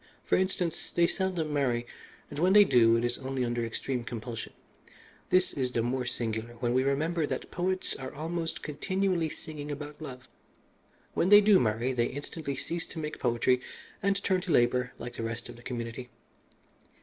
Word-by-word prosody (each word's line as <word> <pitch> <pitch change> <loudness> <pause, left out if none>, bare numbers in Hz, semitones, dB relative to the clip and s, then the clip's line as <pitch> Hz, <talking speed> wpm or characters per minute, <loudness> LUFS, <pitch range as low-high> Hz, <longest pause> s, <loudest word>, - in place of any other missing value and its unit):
For - - +3
instance, 180 -3 -1
they 170 - +4
seldom 175 -4 -1
marry, 125 -5 +1 0.5
and 145 - -5
when 185 +3 +4
they 210 0 +10
do 115 - +5
it 115 - 0
is 120 0 -1
only 130 -1 -2
under 120 0 -1
extreme 120 +2 -3
compulsion. 115 0 -6 0.8
This 185 0 +3
is 130 -2 -1
the 115 - +1
more 125 +1 -1
singular 115 -1 -3
when 120 +1 -1
we 130 - +4
remember 155 +4 +1
that - - -4
poets 185 +1 -1
are 130 0 -6
almost 165 +2 -3
continually 185 +2 0
singing 150 -2 -7
about 145 +1 -6
love. 130 -4 -8 0.9
When 175 - +2
they 205 0 +10
do 210 -2 +6
marry 115 +3 +1
they 120 -1 +2
instantly 145 +1 -5
cease 165 +5 -4
to - - -11
make 155 -1 -4
poetry 125 +1 +2 0.4
and 200 0 +2
turn 185 -2 +2
to 180 - -3
labour 125 -1 +3
like 120 +1 -7
the - - -3
rest 115 +1 -4
of - - -8
the 120 - -14
community. 120 0 -5
135 Hz, 180 wpm, -30 LUFS, 120-170 Hz, 0.9 s, they